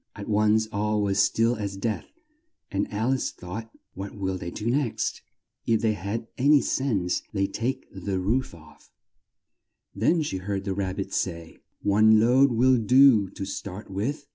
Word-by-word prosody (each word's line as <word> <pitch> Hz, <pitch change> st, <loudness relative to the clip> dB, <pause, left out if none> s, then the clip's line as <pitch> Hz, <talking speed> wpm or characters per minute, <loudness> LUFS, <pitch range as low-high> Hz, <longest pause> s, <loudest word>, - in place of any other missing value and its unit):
At -, -, -8 dB
once 105 Hz, +1 st, +3 dB
all 105 Hz, +1 st, 0 dB
was 100 Hz, -1 st, 0 dB
still 115 Hz, +4 st, +3 dB
as 100 Hz, -2 st, -4 dB
death, 110 Hz, +1 st, -3 dB, 0.6 s
and 100 Hz, +1 st, -2 dB
Al 110 Hz, +5 st, 0 dB
ice 130 Hz, -, -1 dB
thought, 110 Hz, +6 st, -8 dB, 0.2 s
"What 95 Hz, +2 st, -7 dB
will 95 Hz, -2 st, -2 dB
they 85 Hz, -1 st, -5 dB
do 105 Hz, +4 st, -7 dB
next? 125 Hz, 0 st, -1 dB, 0.5 s
If 115 Hz, -1 st, +2 dB
they 110 Hz, -1 st, +2 dB
had 105 Hz, +4 st, -4 dB
an 140 Hz, +4 st, +5 dB
y 145 Hz, -, +7 dB
sense, 105 Hz, -12 st, 0 dB
they'd 100 Hz, -1 st, -1 dB
take 130 Hz, +4 st, -2 dB
the 95 Hz, 0 st, -3 dB
roof 110 Hz, +3 st, -1 dB
off." 80 Hz, -1 st, -18 dB, 1.0 s
Then 155 Hz, -, +2 dB
she 95 Hz, -, -3 dB
heard 95 Hz, +1 st, -3 dB
the 95 Hz, -1 st, -2 dB
Rab 95 Hz, -1 st, -2 dB
bit 95 Hz, -, -5 dB
say, 85 Hz, -3 st, -3 dB, 0.2 s
"One 110 Hz, +2 st, +5 dB
load 130 Hz, +4 st, +4 dB
will 125 Hz, +2 st, +4 dB
do 120 Hz, -3 st, +5 dB
to 95 Hz, -, -6 dB
start 100 Hz, +1 st, -7 dB
with." 135 Hz, +10 st, -3 dB
105 Hz, 170 wpm, -26 LUFS, 95-120 Hz, 1.0 s, y